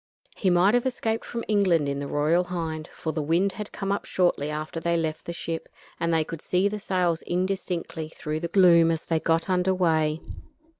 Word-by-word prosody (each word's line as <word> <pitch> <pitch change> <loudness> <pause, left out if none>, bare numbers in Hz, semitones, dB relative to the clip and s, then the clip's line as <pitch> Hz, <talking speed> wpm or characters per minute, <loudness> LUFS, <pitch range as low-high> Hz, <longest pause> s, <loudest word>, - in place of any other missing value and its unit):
He 190 - +1
might 180 +3 +4
have 245 +1 +2
escaped 225 -3 -1
from 230 -1 -5
England 185 -8 +3
in 140 0 -2
the 140 - -4
Royal 155 +5 +2
Hind, 160 -3 -4
for 160 - -5
the 155 - -1
wind 170 +6 +2
had 210 +2 -7
come 195 -1 -3
up 200 - -1
shortly 175 -5 +1
after 155 +2 -4
they 170 +1 +1
left 160 -1 -2
the - - -4
ship, 165 -1 -5 0.3
and 170 0 0
they 160 -1 +3
could 165 0 -7
see 185 +2 +1
the 210 +1 -3
sails 180 -4 0
indistinctly 175 -3 -2
through 155 -1 -4
the 170 - -3
gloom 170 -2 +6
as 165 0 -1
she 165 -1 +1
got 165 +1 +1
under 185 0 +2
way. 160 -3 +2
170 Hz, 205 wpm, -26 LUFS, 160-185 Hz, 0.3 s, gloom